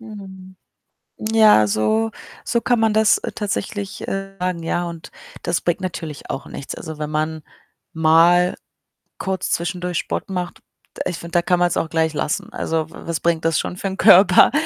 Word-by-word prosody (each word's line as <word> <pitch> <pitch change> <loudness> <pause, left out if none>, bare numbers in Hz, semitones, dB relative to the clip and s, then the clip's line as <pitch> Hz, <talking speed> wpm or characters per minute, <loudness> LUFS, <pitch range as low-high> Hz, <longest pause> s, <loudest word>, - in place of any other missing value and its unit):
Mhm. 190 -4 -11 0.6
Ja, 215 - +5
so 220 - +1 0.3
so 235 - 0
kann 245 -1 +2
man 220 -1 +2
das, 220 0 +4
äh, - - -5
tatsächlich, 200 -1 -4
äh, 195 0 -4
sagen, 180 -2 -2
ja, 175 +1 -1
und 170 -1 -8 0.3
das 170 - 0
bringt 175 - -1
natürlich 165 -5 -6
auch 135 - -5
nichts. 135 - -7
Also, 160 -2 -8
wenn 150 0 -4
man 155 0 -2 0.5
mal 165 +3 +4 0.6
kurz 190 -1 -3
zwischendurch 175 +1 -2
Sport - - -3
macht 180 -2 -4 0.4
d - - -6
ich 175 - -3
finde, 170 - -9
da 175 - +4
kann 180 +1 +2
man's 175 0 +2
auch 160 - -1
gleich 160 -1 +1
lassen. 150 - -2
Also, 160 -1 -1
w - - -15
was 165 -2 -1
bringt 165 -1 0
das 165 -1 +2
schon 180 - -4
für 195 - -3
'n 190 0 -4
Körper? 185 +2 +7
175 Hz, 180 wpm, -21 LUFS, 160-195 Hz, 0.6 s, Körper